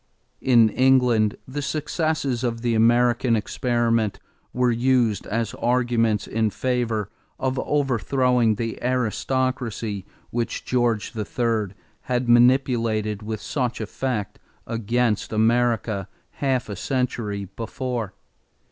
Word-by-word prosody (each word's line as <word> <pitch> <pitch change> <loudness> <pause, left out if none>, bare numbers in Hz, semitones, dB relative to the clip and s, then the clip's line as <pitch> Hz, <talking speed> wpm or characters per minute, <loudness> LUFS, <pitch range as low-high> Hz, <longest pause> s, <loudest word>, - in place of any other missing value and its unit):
In 115 -4 +5
England, 125 -4 +3
the 140 +3 -4
successes 150 -3 -1
of 115 -2 -2
the 120 -1 0
American 120 +1 +3
experiment 115 -1 0 0.3
were 125 -1 +2
used 120 -2 +1
as 115 0 -2
arguments 120 -3 +1
in 110 0 0
favor 115 -3 -1 0.3
of 130 0 -1
overthrowing 125 -4 +1
the 115 +1 -4
aristocracy 125 -3 -1 0.3
which 120 0 -3
George 120 -3 0
III 110 -2 -1 0.3
had 125 0 0
manipulated 120 -4 +3
with 110 0 -5
such 125 -4 -2
effect 110 -1 -3 0.3
against 115 -1 0
America 110 -2 +1 0.2
half 130 -3 -1
a 100 - -5
century 115 -4 -2
before. 115 -3 -4
120 Hz, 105 wpm, -23 LUFS, 110-125 Hz, 0.3 s, In